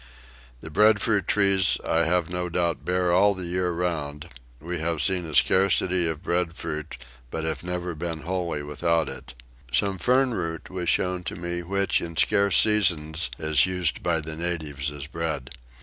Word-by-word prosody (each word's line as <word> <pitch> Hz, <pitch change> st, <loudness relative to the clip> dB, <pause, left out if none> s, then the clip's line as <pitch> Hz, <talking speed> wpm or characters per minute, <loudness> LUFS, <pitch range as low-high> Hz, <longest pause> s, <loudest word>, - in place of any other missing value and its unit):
The 80 Hz, -, -9 dB
breadfruit 105 Hz, +1 st, +3 dB
trees 100 Hz, -2 st, +4 dB
I 85 Hz, 0 st, +2 dB
have 85 Hz, 0 st, +1 dB
no 90 Hz, 0 st, -3 dB
doubt 85 Hz, -6 st, -1 dB
bear 90 Hz, +1 st, +1 dB
all 100 Hz, +3 st, +4 dB
the 95 Hz, -1 st, -5 dB
year 90 Hz, +1 st, -1 dB
round: 85 Hz, -3 st, -3 dB, 0.3 s
we 85 Hz, +3 st, -4 dB
have 80 Hz, 0 st, -1 dB
seen 90 Hz, +1 st, +1 dB
a 75 Hz, -, -5 dB
scarcity 95 Hz, -1 st, +3 dB
of 80 Hz, -1 st, -4 dB
breadfruit 80 Hz, -3 st, -3 dB, 0.3 s
but 80 Hz, -, -4 dB
have 80 Hz, +1 st, -3 dB
never 90 Hz, 0 st, -3 dB
been 80 Hz, 0 st, -4 dB
wholly 85 Hz, -2 st, -3 dB
without 80 Hz, +2 st, 0 dB
it. 65 Hz, -, -8 dB, 0.4 s
Some 95 Hz, +9 st, +1 dB
fern 130 Hz, +2 st, +3 dB
root 80 Hz, -5 st, -4 dB
was 90 Hz, -2 st, -2 dB
shown 90 Hz, -1 st, 0 dB
to -, -, -4 dB
me 85 Hz, 0 st, -4 dB
which 100 Hz, +3 st, 0 dB
in 85 Hz, -1 st, -6 dB
scarce 100 Hz, +2 st, +3 dB
seasons 85 Hz, -7 st, +2 dB
is 80 Hz, 0 st, +3 dB
used 90 Hz, -3 st, -1 dB
by 85 Hz, -2 st, 0 dB
the 80 Hz, +1 st, -4 dB
natives 80 Hz, -4 st, -3 dB
as 70 Hz, -2 st, -7 dB
bread. 75 Hz, -4 st, -4 dB
85 Hz, 165 wpm, -25 LUFS, 80-90 Hz, 0.4 s, trees